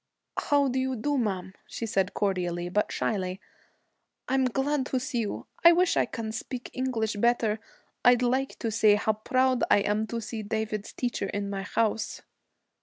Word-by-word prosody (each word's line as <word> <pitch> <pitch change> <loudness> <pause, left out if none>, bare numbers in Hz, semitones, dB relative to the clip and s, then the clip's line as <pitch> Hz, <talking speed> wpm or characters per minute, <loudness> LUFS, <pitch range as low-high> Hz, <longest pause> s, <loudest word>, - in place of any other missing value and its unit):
'How 285 -1 +2
do 260 0 0
you 260 0 0
do, 290 +6 -1
ma'am?' 190 -7 -1
she 230 - -4
said, 195 -4 0
cordially, 175 -3 -1
but 210 +3 0
shyly. 185 -3 -1 0.9
'I'm 265 0 +2
glad 270 +2 0
to 260 - 0
see 260 -1 -2
you. 215 -3 -3 0.2
I 340 0 +9
wish 360 +1 +3
I - - +2
can 225 -2 -4
speak 245 +3 -6
English 230 -5 -1
better, 225 -1 +2 0.4
I'd 245 0 +6
like 260 +2 0
to 225 - -2
say 215 -1 +5
how 215 +1 +1
proud 255 +3 +1
I 205 - +5
am 210 +2 0
to 235 - -3
see 225 0 -5
David's 215 0 -3
teacher 240 -5 -2
in 200 0 -3
my 195 -1 -3
house.' 220 +3 -1
225 Hz, 175 wpm, -28 LUFS, 205-255 Hz, 0.9 s, I